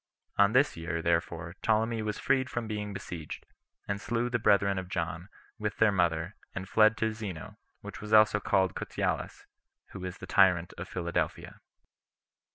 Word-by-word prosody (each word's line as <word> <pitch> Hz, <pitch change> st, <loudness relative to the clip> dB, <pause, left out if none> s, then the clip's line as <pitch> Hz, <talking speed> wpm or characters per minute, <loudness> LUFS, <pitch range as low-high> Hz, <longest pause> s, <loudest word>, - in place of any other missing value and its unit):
On 100 Hz, +1 st, +4 dB
this 135 Hz, +3 st, +4 dB
year, 85 Hz, 0 st, -3 dB
therefore, 85 Hz, 0 st, -1 dB
Ptolemy 110 Hz, +1 st, +1 dB
was 105 Hz, -1 st, -3 dB
freed 130 Hz, -1 st, +1 dB
from 120 Hz, -1 st, -3 dB
being 105 Hz, -1 st, -4 dB
besieged, 85 Hz, -5 st, -7 dB, 0.4 s
and 100 Hz, 0 st, -2 dB
slew 120 Hz, +2 st, -1 dB
the 120 Hz, -, +1 dB
brethren 100 Hz, -2 st, +3 dB
of 90 Hz, -1 st, -7 dB
John, 85 Hz, +1 st, -3 dB, 0.3 s
with 105 Hz, -1 st, -3 dB
their 110 Hz, -1 st, +5 dB
mother, 85 Hz, -1 st, 0 dB, 0.2 s
and 95 Hz, 0 st, -5 dB
fled 110 Hz, +1 st, +4 dB
to 110 Hz, 0 st, 0 dB
Zeno, 100 Hz, -7 st, -7 dB, 0.2 s
who -, -, -6 dB
was 105 Hz, 0 st, -7 dB
also 110 Hz, -1 st, +6 dB
called 95 Hz, -3 st, +2 dB
Cotylas, -, -, -3 dB, 0.5 s
who 100 Hz, -, -8 dB
was 90 Hz, 0 st, -6 dB
tyrant 90 Hz, -2 st, +3 dB
of 90 Hz, +2 st, -7 dB
Philadelphia. 85 Hz, -2 st, -3 dB
100 Hz, 160 wpm, -30 LUFS, 90-110 Hz, 0.5 s, also